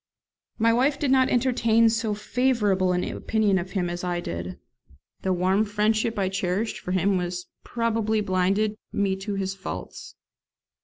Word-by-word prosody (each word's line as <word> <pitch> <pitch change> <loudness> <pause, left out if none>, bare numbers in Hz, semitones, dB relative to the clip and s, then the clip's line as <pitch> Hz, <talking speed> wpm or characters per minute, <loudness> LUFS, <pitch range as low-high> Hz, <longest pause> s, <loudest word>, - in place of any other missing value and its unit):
My 230 0 +3
wife 270 +4 +2
did 280 -3 0
not 260 -1 +4
entertain 230 -2 +3
so 225 -1 0
favourable 210 -4 +1
an 180 0 0
opinion 210 -3 0
of 185 +1 -7
him 185 -3 0
as 175 +1 -4
I 175 -1 -1
did; 85 - -5 0.6
the 190 - 0
warm 185 +3 +2
friendship 215 +2 0
I 195 -2 +1
cherished 190 +3 -2
for 180 - -6
him 185 0 +2 0.4
probably 225 -2 0
blinded 200 +2 0
me 195 -1 0
to 200 +1 -4
his 195 -1 -2
faults. 195 0 -8
205 Hz, 150 wpm, -25 LUFS, 185-225 Hz, 0.6 s, not